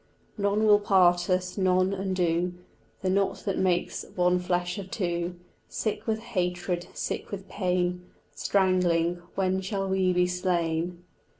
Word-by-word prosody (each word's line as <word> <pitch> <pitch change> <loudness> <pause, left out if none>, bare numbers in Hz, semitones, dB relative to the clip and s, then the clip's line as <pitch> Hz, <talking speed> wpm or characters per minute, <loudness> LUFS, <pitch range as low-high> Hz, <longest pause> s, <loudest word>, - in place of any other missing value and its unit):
None 205 +1 +1
will 210 -1 +6
part 180 -3 +4
us, 185 +1 0
none 185 0 +3
undo 180 -2 0 0.5
The 185 - +1
knot 195 0 0
that 195 - -1
makes 180 -2 0
one 180 0 +3
flesh 180 +1 -1
of 190 -1 -7
two, 175 -3 -2 0.3
Sick 215 0 -3
with 220 0 0
hatred, 180 -4 -2
sick - - -3
with 195 -1 -6
pain, 180 -1 -1 0.2
Strangling 175 +1 +2
When 190 0 +1
shall 195 0 -2
we 190 -1 +2
be 180 0 +3
slain? 175 -1 -1
180 Hz, 135 wpm, -27 LUFS, 175-195 Hz, 0.5 s, will